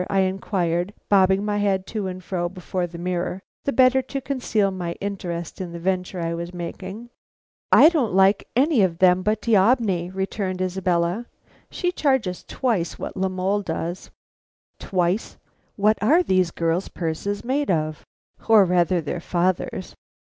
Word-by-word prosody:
I 195 -1 +2
inquired, 185 -1 -1
bobbing 195 0 +4
my 210 -1 0
head 195 -2 +1
to 210 -3 -2
and 185 0 -6
fro 175 -2 -2
before 180 0 -3
the 170 0 -10
mirror, 180 +1 -2 0.3
the 280 - +1
better 260 +1 +4
to 275 +2 -5
conceal 245 -7 0
my 175 -2 -4
interest 180 -4 -5
in 175 -2 -6
the 170 - -6
venture 185 +1 -2
I 165 0 -2
was 170 +1 -5
making. 190 +7 -7 0.6
"I - - +9
don't 275 - +1
like 195 +1 +4
any 270 -1 +3
of 180 -4 +1
them 185 0 +4
but 215 +3 -1
D'Aubigny," 205 -5 +3
returned 190 0 -3
Isabella. 185 +3 0 0.4
"She 355 - -1
charges 265 - 0
twice 220 -10 -1
what - - -6
La 190 0 0
Mole 190 +2 0
does 170 0 -4 0.4
" - - -55
Twice! 180 +2 0 0.4
What 215 +2 +2
are 310 - +4
these 185 - +2
girls' 165 +2 -1
purses 180 +6 -3
made 280 +4 0
of, 155 -3 -1 0.5
or 215 -3 +7
rather 180 0 +2
their 160 +3 -4
father's! 180 +1 -1
190 Hz, 155 wpm, -23 LUFS, 175-210 Hz, 0.6 s, I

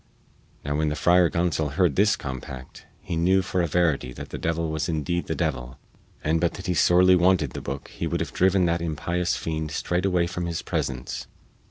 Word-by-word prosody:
Now 70 0 -1
when 80 0 +1
the 75 - -2
Friar 90 +1 +4
Gonsol 80 -4 0
heard 85 -2 +2
this 105 +2 +4
compact, 65 -1 -8
he 85 - -4
knew 95 +3 +3
for 95 -1 -1
a 85 - +1
verity 80 -6 +1
that - - -8
the - - -6
devil 80 -1 -1
was 80 +2 -2
indeed 85 +2 -1
the - - -2
devil, 60 +1 -3 0.5
and 80 +2 +1
but 85 - +1
that 95 - -8
he 90 - 0
sorely 90 +2 +5
wanted 90 -6 +3
the - - -6
booke 70 +2 -6
he - - -4
would - - -1
have - - -4
driven 95 0 +3
that 85 0 0
impious 85 +2 -1
fiend 80 -1 -3
straightway 90 +3 0
from 90 0 -4
his 85 -1 -3
presence. 65 -2 -3
85 Hz, 200 wpm, -25 LUFS, 75-90 Hz, 0.5 s, sorely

